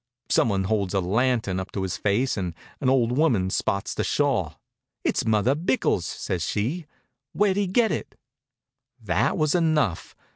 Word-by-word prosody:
Some - - +3
one 95 -2 0
holds 100 -1 -1
a - - +3
lantern 110 0 +1
up 95 - -6
to 95 - -2
his 95 -2 -2
face 110 +6 +1
and 90 -4 -3 0.2
an 130 - +1
old 125 -2 +2
woman 115 -12 +2
spots 100 +2 -1
the - - -2
shawl. 115 - 0 0.4
"It's - - 0
Mother 110 +4 +3
Bickell's," 160 - 0
says 90 - -3
she. 130 - -2 0.5
"Where 205 -1 +3
did 200 - -1
he 200 - +1
get 220 +5 +2
it?" - - -4 0.8
That - - 0
was 155 -2 +2
enough. 155 - +1
115 Hz, 170 wpm, -25 LUFS, 95-150 Hz, 0.8 s, Some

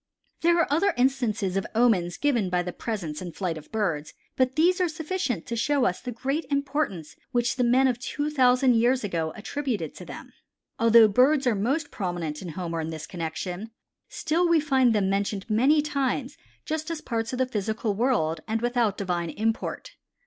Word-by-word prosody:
There 340 +1 +4
are 335 - +4
other 400 +7 +2
instances 240 -7 +1
of 195 +1 -1
omens 200 -7 +2
given 240 -10 +1
by 180 -1 +1
the 180 0 -5
presence 175 -10 -4
and 175 -2 -7
flight 180 -4 -2
of 155 -1 -11
birds, 175 -9 -2 0.2
but 260 0 +1
these 360 +4 +3
are 360 - +2
sufficient 310 - -3
to 235 - -4
show 275 +3 +1
us 180 - 0
the 250 - -5
great 270 +7 -2
importance 280 - -2 0.2
which 240 -2 +1
the 255 - +1
men 255 +3 +4
of 245 -2 0
two 290 +3 -3
thousand 255 -3 +4
years 245 +2 +2
ago 165 -5 -2
attributed 250 +2 -3
to - - -10
them. - - -10 0.5
Although 230 -1 +7
birds 265 +7 +3
are 245 - +3
most 270 +10 -1
prominent 175 -5 -3
in 180 - -6
Homer 165 0 -4
in 160 - -4
this 155 -1 -6
connection, 175 +5 -5 0.4
still 335 +3 0
we 335 -1 +5
find 265 -6 +3
them 200 -2 +2
mentioned 200 0 -1
many 265 +8 +3
times 275 -3 -1 0.3
just 315 0 -3
as 330 -2 -3
parts 230 -1 -3
of 255 - -3
the 260 - +2
physical 220 -2 -2
world 195 -9 0
and 225 +1 0
without 240 -3 0
divine 175 -3 -2
import. 225 - -2
235 Hz, 185 wpm, -26 LUFS, 190-275 Hz, 0.5 s, Although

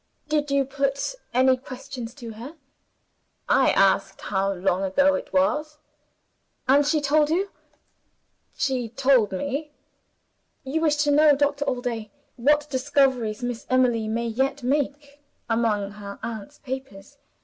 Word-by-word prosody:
"Did 300 -1 0
you 275 -1 +2
put 275 - -1 0.2
any 260 +1 +4
questions 255 -2 -8
to 240 -5 -8
her?" 240 +9 -9 0.9
"I - - +4
asked - - +2
how 195 0 0
long 185 0 0
ago 280 +10 +3
it 280 - -4
was." 300 +2 +1 0.9
"And 280 +2 +4
she 305 +1 +2
told 295 +1 +3
you?" 380 +5 0 1.0
"She 255 -4 -1
told 255 -3 +3
me." 285 +9 -3 0.9
"You 285 +5 -2
wish 310 -2 +3
to 295 - +2
know, 295 0 +6
Doctor 285 0 0
Allday, 245 -5 -3 0.3
what 295 +4 +3
discoveries 260 -5 +1
Miss 245 -1 -4
Emily 245 -4 +2
may 230 +2 -1
yet 265 +4 -1
make, 285 +2 -2 0.3
among 220 -3 0
her 200 -1 -9
aunt's 220 -3 -6
papers. 265 -2 -8
265 Hz, 130 wpm, -24 LUFS, 230-285 Hz, 1.0 s, know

